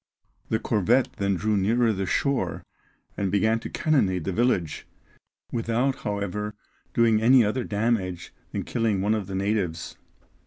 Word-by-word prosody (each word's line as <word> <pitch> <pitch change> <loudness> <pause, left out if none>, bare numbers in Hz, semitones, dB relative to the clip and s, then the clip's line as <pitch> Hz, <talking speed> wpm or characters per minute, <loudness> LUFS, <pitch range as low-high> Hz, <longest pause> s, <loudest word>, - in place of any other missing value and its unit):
The 110 - +2
corvette 115 +4 +2
then 100 -1 +1
drew 105 +3 0
nearer 115 +5 +2
to - - +2
the 95 -1 -3
shore, 140 +6 0 0.5
and 100 -2 -1
began 110 +3 +2
to - - -7
cannonade 100 - +1
the 95 - -2
village, 95 -8 0 0.6
without, 120 +3 0
however, 105 -2 -3 0.4
doing 115 -2 +4
any 125 0 +6
other 120 +5 -1
damage 100 -5 -1 0.2
than - - -3
killing 110 -5 0
one 105 +2 +2
of 105 -4 -2
the 95 - -5
natives. 95 -5 -2
105 Hz, 150 wpm, -25 LUFS, 95-115 Hz, 0.6 s, any